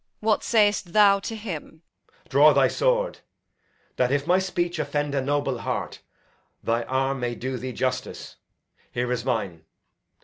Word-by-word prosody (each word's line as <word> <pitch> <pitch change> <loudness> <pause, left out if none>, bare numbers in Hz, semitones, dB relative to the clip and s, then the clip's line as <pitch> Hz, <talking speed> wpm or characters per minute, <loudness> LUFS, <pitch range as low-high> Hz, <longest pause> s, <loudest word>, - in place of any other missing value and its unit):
What 215 -1 +1
say'st 205 -5 +2
thou 200 -2 +6
to 225 - -5
him? 170 -6 -7 0.4
Edg. - - -27
Draw - - +6
thy - - +4
sword, - - 0 0.8
That, 125 0 +2
if 140 0 0
my 180 +3 +4
speech 175 -3 -2
offend 145 -1 -1
a 140 - +1
noble 140 -2 -1
heart, - - -4 0.6
Thy 115 +1 +1
arm 135 +1 0
may 120 -1 -2
do 130 +2 -4
thee 130 +1 -5
justice. 125 0 -3 0.5
Here 125 0 -2
is 120 -2 -1
mine. 105 -10 -2
145 Hz, 150 wpm, -25 LUFS, 125-190 Hz, 0.8 s, thou